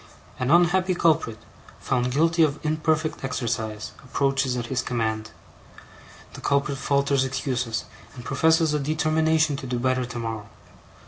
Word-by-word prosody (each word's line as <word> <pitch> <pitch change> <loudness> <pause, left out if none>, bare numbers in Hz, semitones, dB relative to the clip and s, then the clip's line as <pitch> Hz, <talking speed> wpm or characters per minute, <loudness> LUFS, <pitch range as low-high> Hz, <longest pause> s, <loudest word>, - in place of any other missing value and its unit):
An 125 - -1
unhappy 175 +3 +4
culprit, 155 -10 +2 0.4
found 125 0 0
guilty 165 +5 +2
of 155 -2 +3
imperfect 155 0 0
exercise, 110 -5 -3
approaches 135 -1 0
at 120 - -3
his 125 +1 -1
command. 110 -3 -2 1.0
The - - -9
culprit 140 0 0
falters 140 0 +2
excuses, 125 -4 -2 0.3
and 125 -1 -10
professes 160 -1 +3
a 150 - +1
determination 155 +1 +1
to 135 - -7
do 125 0 -2
better 130 +1 0
tomorrow. 115 -3 -5
135 Hz, 130 wpm, -25 LUFS, 125-155 Hz, 1.0 s, unhappy